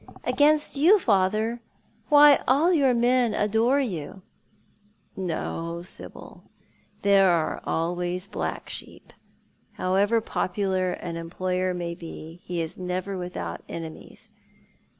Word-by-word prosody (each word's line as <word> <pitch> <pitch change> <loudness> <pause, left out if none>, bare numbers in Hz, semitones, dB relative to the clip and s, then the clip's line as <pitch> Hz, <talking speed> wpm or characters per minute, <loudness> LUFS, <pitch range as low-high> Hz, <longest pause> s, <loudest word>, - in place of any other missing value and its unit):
"Against 300 +1 +2
you, 335 +10 +6
father? 215 - +1 0.5
Why, 290 -1 +7
all 300 +8 +4
your 280 -6 +4
men 240 -1 +2
adore 225 +6 +2
you." 190 - -4 0.9
"No, 170 -1 -4
Sibyl. 180 - -11 0.6
There 195 -1 +5
are 170 -3 0
always 175 +2 -2
black 200 - -4
sheep. - - -9 0.6
However 200 +5 +2
popular 190 -3 -1
an 170 -1 -6
employer 185 +2 -2
may 170 -1 -4
be, 165 0 -10
he 175 -1 -3
is 160 - -7
never 185 +2 -3
without 175 - -5
enemies. 160 -1 -8
185 Hz, 110 wpm, -25 LUFS, 175-235 Hz, 0.9 s, Why